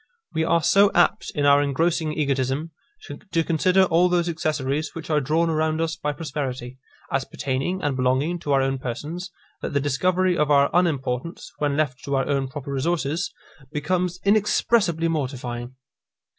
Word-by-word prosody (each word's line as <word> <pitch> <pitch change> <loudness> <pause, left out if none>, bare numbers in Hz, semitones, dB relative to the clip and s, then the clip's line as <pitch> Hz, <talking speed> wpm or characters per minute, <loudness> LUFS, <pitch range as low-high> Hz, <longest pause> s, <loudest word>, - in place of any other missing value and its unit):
We 160 - +1
are 170 0 +2
so 200 +4 +5
apt, 175 - +2
in 145 -2 +1
our 140 0 +6
engrossing 160 +3 0
egotism, 140 +1 -1 0.3
to 185 - -3
consider 180 +4 +3
all 180 0 +3
those 175 -1 +1
accessories 155 -3 -2
which 165 -1 -6
are 150 -1 +3
drawn 160 +5 +1
around 155 0 0
us 165 0 -1
by 150 -2 -2
prosperity, 130 -4 -5 0.3
as 135 0 +1
pertaining 140 +8 -3
and 145 -2 0
belonging 130 +7 +1
to 145 - -4
our 135 -1 +3
own 135 0 -1
persons, 150 +9 -5 0.3
that - - -4
the 140 - +2
discovery 180 +6 +1
of 150 -3 +1
our 140 -1 +4
unimportance, 160 -3 -1
when 145 -1 0
left 135 -5 -1
to 140 - -1
our 135 - 0
own 140 -2 0
proper 140 +1 -6
resources, 160 +4 -1 0.4
becomes 180 +4 -1
inexpressibly 200 -4 +2
mortifying. 130 -5 -3
150 Hz, 160 wpm, -24 LUFS, 135-170 Hz, 0.4 s, our